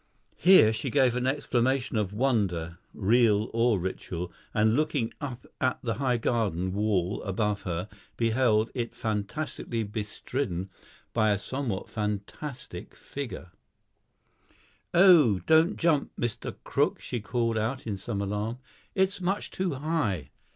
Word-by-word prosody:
Here 175 - +7
she 110 - -2
gave 130 -4 +3
an 125 +1 0
exclamation 130 -1 +1
of 105 -3 0
wonder, 100 -8 0
real 110 0 +3
or 115 -1 +3
ritual, 90 -1 -4 0.2
and 110 0 +3
looking 145 -6 0
up 130 -4 -5 0.2
at 130 0 +2
the 115 -2 0
high 125 -3 +2
garden 100 -6 0
wall 100 -2 0
above 105 +1 -1
her, 90 +3 -2 0.3
beheld 115 -1 +2
it 120 -3 -3
fantastically 115 +2 -3
bestridden 105 -2 -3 0.4
by 110 -2 +3
a 100 - +3
somewhat 120 -1 -3
fantastic 105 0 -5
figure. 125 -10 -7 1.4
"Oh, 170 - +7
don't 160 +5 +4
jump, 165 -4 +2
Mr. 120 -3 -3
Crook," - - +1
she 120 - -4
called 115 +1 0
out 125 +5 -2
in 105 -3 -2
some 100 +1 -4
alarm; 105 +4 -2 0.4
"it's 190 -1 +1
much 190 +3 -1
too 185 -6 -1
high." 135 - -1
115 Hz, 130 wpm, -28 LUFS, 105-135 Hz, 1.4 s, Here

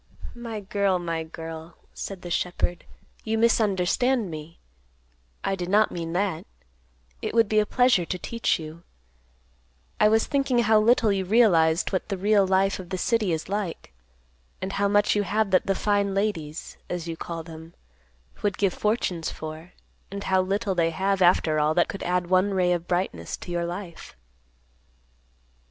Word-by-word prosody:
"My 230 -3 -6
girl, 200 -1 +1
my 170 -2 -3
girl," 160 0 -9 0.2
said 195 -2 -7
the 175 - -6
shepherd, 175 0 -1 0.4
"you 220 0 -1
misunderstand 220 0 +2
me. 155 +1 -8 0.9
I - - 0
did 180 -1 -5
not 210 +2 +4
mean 165 -1 -4
that. 185 -3 -1 0.7
It - - -4
would 230 -2 +5
be 215 +1 +3
a 210 - +1
pleasure 250 -7 +3
to 180 - -3
teach 230 +6 -1
you. 160 +1 -9 1.2
I 210 - +6
was 220 +1 +3
thinking 275 -3 0
how 220 -1 +5
little 225 0 +4
you 195 -1 0
realized 180 -6 +3
what 190 +1 -2
the 195 - -2
real 200 0 +3
life 195 +1 +2
of 180 -2 -9
the 190 - -3
city 215 0 +1
is 160 -1 -2
like, 195 - -4 0.7
and 190 +1 -4
how 200 0 +1
much 205 +1 +3
you 205 - +2
have 205 +1 0
that 185 - +3
the 195 - +2
'fine 200 -1 +1
ladies,' 170 -7 -3
as 175 -1 -4
you 165 - -4
call 165 0 -6
them, 160 0 -11 0.7
would 205 -2 0
give 195 -3 +1
fortunes 200 -6 -1
for, 155 +3 -8 0.4
and 200 0 -6
how 190 0 +2
little 195 +2 -1
they 170 -2 +2
have 190 +3 0
after 170 -3 +4
all 150 +1 +2
that 175 - +3
could 195 - -6
add 180 0 0
one 185 +2 +2
ray 180 -1 +2
of 175 -1 -1
brightness 180 +1 -2
to 175 - -9
your 170 0 -1
life." 175 0 -7
190 Hz, 170 wpm, -25 LUFS, 170-210 Hz, 1.2 s, I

